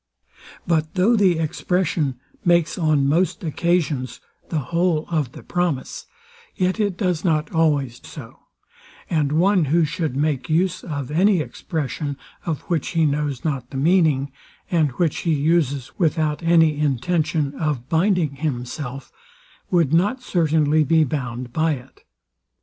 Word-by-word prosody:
But 160 -1 0
though 200 +6 +4
the 190 -6 +3
expression 160 -4 -1 0.2
makes 170 -2 +3
on 155 -6 +2
most 170 +7 +1
occasions 160 -5 -1 0.3
the 165 - -1 0.2
whole 170 -2 +1
of 150 -7 -1
the - - -11
promise, 175 -7 -2 0.5
yet 185 +3 0
it 200 -4 0
does 180 -5 -1
not 155 -3 0
always 145 -7 +1
so; - - -11 0.7
and 150 -4 +1
one, 180 +1 +3
who 160 +4 +3
should 155 -3 -3
make 145 0 -1
use 180 +3 +1
of 145 -5 -5
any 185 +4 +3
expression, 145 0 -4 0.3
of 160 -4 -2
which 165 -5 -2
he 165 - +4
knows 145 -2 -1
not 135 -5 -2
the 135 - -6
meaning, 150 -3 +2 0.4
and 160 -4 +3
which 165 +2 0
he 165 -3 +1
uses 145 -3 +1
without 155 -3 +1
any 165 -3 +3
intention 150 +1 0
of 145 -5 -2
binding 165 -3 +1
himself, 135 -1 -4 0.6
would 165 -5 +2
not 205 +10 +2
certainly 155 -3 +2
be 160 +2 +3
bound 125 -4 -4
by 160 +2 +2
it. 130 -1 -11
155 Hz, 140 wpm, -22 LUFS, 145-170 Hz, 0.7 s, though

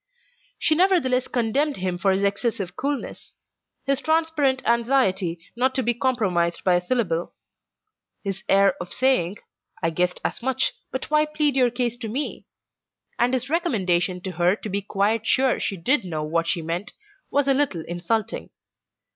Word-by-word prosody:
She 315 - +2
nevertheless 310 -8 +3
condemned 265 +5 0
him 180 -1 -2
for 195 +1 +3
his 190 +1 +1
excessive 200 -2 -1
coolness; 280 0 -4 0.5
his 275 0 +1
transparent 315 -5 +1
anxiety 230 -8 +2 0.2
not 260 +2 +1
to 260 - +1
be 240 +1 +2
compromised 200 -10 0
by 185 - +3
a 175 - +3
syllable; 180 -5 -1 0.9
his 195 -2 -4
air 195 -1 +5
of 175 - -7
saying, 230 -8 +2 0.4
"I 165 -2 0
guessed 180 +2 0
as - - -2
much, 265 +1 +1 0.2
but 260 +3 -5
why 305 0 +4
plead 300 -2 +1
your 255 -2 +4
case 240 0 -2
to 235 -2 -5
me?" 260 +7 -4 0.7
And 245 +2 +3
his 255 +1 -2
recommendation 185 - 0
to 190 - -4
her 175 +2 +2
to 215 - -7
be 200 +1 -1
quite 210 +3 0
sure 260 -1 +3
she 195 - -2
did 255 - +2
know 160 -4 -3
what 165 +2 0
she 170 -1 0
meant, 170 +5 -4 0.4
was 285 -1 +1
a 275 - +5
little 260 - 0
insulting. 215 +6 -2
225 Hz, 165 wpm, -24 LUFS, 185-265 Hz, 0.9 s, air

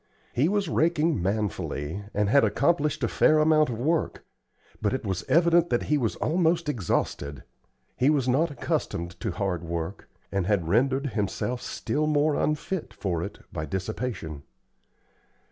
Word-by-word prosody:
He 140 +7 +2
was 205 -1 0
raking 160 - +2
manfully, 95 -3 -2
and 105 -1 +1
had 140 +7 +5
accomplished 150 -3 +1
a - - +3
fair 155 - +4
amount 155 -1 +4
of 115 - -3
work, 155 +7 -1 0.6
but 105 +1 +1
it 130 -2 -3
was 95 -2 -1
evident 170 0 +4
that 120 - +1
he - - +4
was 115 -4 0
almost 170 0 +1
exhausted. 75 - -2 0.5
He 130 - +3
was 140 -4 +2
not 145 +7 +3
accustomed 85 - -2
to 110 - -2
hard 90 -2 -2
work, 85 +3 -5 0.2
and 95 -2 0
had 100 -6 +1
rendered 135 - +2
himself 110 +4 -2
still 150 +1 -2
more 150 0 +3
unfit 150 +4 -2
for 90 -5 -2
it - - -6
by 80 0 -3
dissipation. 95 - -4
125 Hz, 150 wpm, -26 LUFS, 95-155 Hz, 0.6 s, had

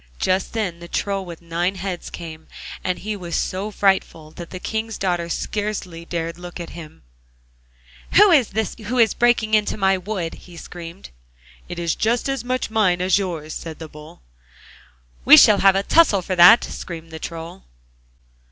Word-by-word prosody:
Just 185 - 0
then 195 -7 -3
the 170 - -10
Troll 195 +2 -2
with 170 -2 -10
nine 170 +3 -1
heads 185 -1 -5
came, 160 -2 -9 0.4
and 180 -1 -1
he 215 +1 -4
was 175 -4 -5
so 195 +3 -2
frightful 190 -6 0
that 170 +1 -10
the 185 - -7
King's 220 +2 -4
daughter 175 -3 -1
scarcely 195 -4 -4
dared 170 -1 -4
to - - -15
look 175 0 -8
at 170 - -7
him 160 -2 -11 1.1
'Who 410 0 +7
is 275 -9 +5
this 220 +1 -2
who 250 +3 -2
is 230 -3 +4
breaking 235 -2 +2 0.3
my 190 -1 +2
wood?' 185 -3 -4 0.2
he 170 - -12
screamed. 170 +2 -10 0.6
'It - - -6
is 170 -1 -1 0.3
as 270 -3 -2
much 255 -2 -2
mine 195 -5 +2
as 185 +2 +2
yours!' 165 -5 -4
said 160 -2 -7
the 160 - -8
Bull. 150 - -14 1.0
'We - - +9
shall 210 -2 +7
have 195 -1 +5
a 195 - +1
tussle 205 - +4
for 185 - -2
that!' 180 +6 +8
screamed 165 -2 -8
the 160 - -8
Troll. 165 +3 -8
185 Hz, 170 wpm, -21 LUFS, 170-205 Hz, 1.1 s, We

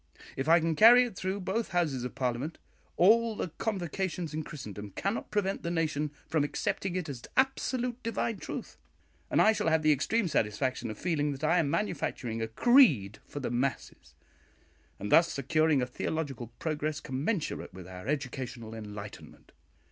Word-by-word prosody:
If 135 +3 -2
I 170 +1 +7
can 165 0 0
carry 240 +7 +8
it 240 -5 -5
through 190 +2 -3
both 205 +5 -1
Houses 155 -8 +1
of 125 -1 -5
Parliament, 130 +4 -2 0.4
all 225 +4 +5
the 185 - -3
convocations 180 -4 -2
in 155 - -2
Christendom 105 -10 -8
cannot 200 +3 -2
prevent 200 -2 -1
the 170 - -3
nation 155 -3 0 0.2
from 155 -3 +1
accepting 175 +5 -2
it 180 -3 -2
as 135 -5 -6 0.2
absolute 255 -2 0
divine 230 -1 -2
truth; - - -6 0.5
and - - +2
I 220 - +6
shall 215 - -1
have 160 -1 +3
the 155 - +5
extreme 190 - +1
satisfaction 120 -2 -1
of 110 - -6
feeling 150 -5 0
that 135 +2 -9
I 165 +3 +4
am 150 -4 +1
manufacturing 135 - -2
a 115 - -1
creed 130 - +4
for 145 - -6
the 135 - -3
masses, 130 +3 -3 0.8
and 105 - -5
thus 170 0 +6
securing 150 0 +2
a - - 0
theological 135 -1 -3
progress 155 -1 -2
commensurate 150 +7 -2
with 90 -1 -10
our 90 +2 -9
educational 130 -5 -4
enlightenment. 105 -2 -9
155 Hz, 165 wpm, -30 LUFS, 130-190 Hz, 0.8 s, carry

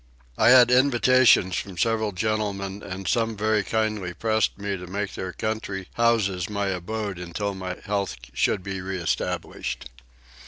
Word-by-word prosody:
I - - +4
had 125 -1 +8
invitations 125 -6 +5
from 95 -3 -5
several 110 +2 +1
gentlemen 100 0 -2
and 95 -1 -6
some 115 -2 +1
very 110 0 +1
kindly 105 -5 -1
pressed 110 +2 +1
me 100 0 -3
to 90 -1 -8
make 100 +1 -3
their 95 - -4
country 100 -3 -4
houses 105 -7 +1
my 100 -1 -1
abode 95 +1 -4
till 100 -1 -1
my 95 -1 -5
health 100 -3 -1 0.2
should 95 - +1
be 95 -1 -4
reestablished. 90 -8 -3
100 Hz, 145 wpm, -25 LUFS, 95-110 Hz, 0.2 s, had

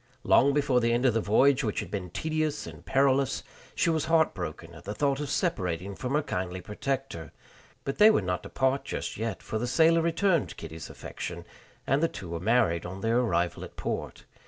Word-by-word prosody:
Long 140 - +5
before 140 -3 +2
the 115 0 +2
end 120 +2 +1
of 125 - +4
the 115 - +1
voyage, 135 +7 +4
which 105 -3 -1
had - - -6
been 95 -3 -4
tedious 155 - -2
and - - -10
perilous, 135 -1 +2 0.3
she 170 - +2
was 160 -1 0
heartbroken 90 - 0
at 80 - -12
the 105 +2 -5
thought 140 +2 +1
of 145 -2 -3
separating 95 - -1
from 125 +7 -3
her 150 - +2
kindly 90 -4 -3
protector; 105 - -4 0.5
but 135 - -4
they 210 +1 +9
were 215 - +3
not 90 -1 -1
to - - -10
part 130 +1 +1
just - - -4
yet, 110 -3 -4
for 110 - -3
the 120 - -2
sailor 165 +5 +4
returned 170 +1 +1
Kitty's 80 0 -8
affection, - - -7 0.4
and 135 +2 +2
the 165 - +4
two 95 - -8
were 85 0 -3
married 85 -5 +2
on 95 +2 -7
their 115 +3 +2
arrival 90 -8 0
at - - -10
port. - - -4
125 Hz, 205 wpm, -28 LUFS, 95-145 Hz, 0.5 s, they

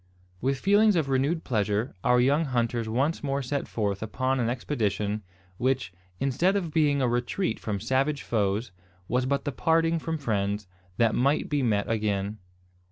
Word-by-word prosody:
With 135 +2 +1
feelings 205 +6 +4
of 155 -5 +1
renewed 140 +5 +1
pleasure, 105 +1 0
our 125 0 +4
young 140 +6 +3
hunters 120 -3 -1
once 140 +9 0
more 140 -1 -1
set 140 +3 -2
forth 100 -3 -2
upon 130 +5 -1
an 115 -1 +1
expedition, 105 -5 -1 0.4
which, 130 -6 0 0.3
instead 140 +9 +2
of 175 -6 -2
being 145 -4 +3
a - - +3
retreat 120 +10 -1
from 105 -2 -3
savage 130 +6 0
foes, 105 0 0 0.4
was 125 +1 0
but 140 +1 0
the 145 - -1
parting 165 +4 +2
from 160 +1 -3
friends, 105 -6 -1 0.3
that 115 -1 +3
might 140 +5 +1
be 145 -1 +1
met 105 -5 +1
again. 105 -1 -1
125 Hz, 165 wpm, -27 LUFS, 110-145 Hz, 0.4 s, feelings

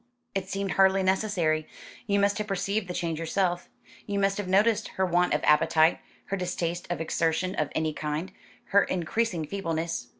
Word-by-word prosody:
"It 190 -1 -3
seemed 195 -1 -2
hardly 190 0 +4
necessary. 185 -5 +1 0.4
You 200 -1 +2
must 200 +1 +2
have 210 - -3
perceived 200 +1 -1
the 180 - -4
change 165 -2 -2
yourself. 175 +1 -1 0.4
You 200 -1 -2
must 195 0 +1
have 205 - -3
noticed 205 +3 +3
her 190 - +3
want 180 0 +2
of - - -2
appetite, 155 +2 +4 0.3
her 195 - -2
distaste 175 -1 -3
for 175 - -1
exertion 165 +3 0
of 155 -6 -1
any 155 -1 0
kind, 155 +5 -3 0.4
her 200 0 +5
increasing 180 0 -1
feebleness." 165 -7 -3
185 Hz, 170 wpm, -27 LUFS, 165-195 Hz, 0.4 s, her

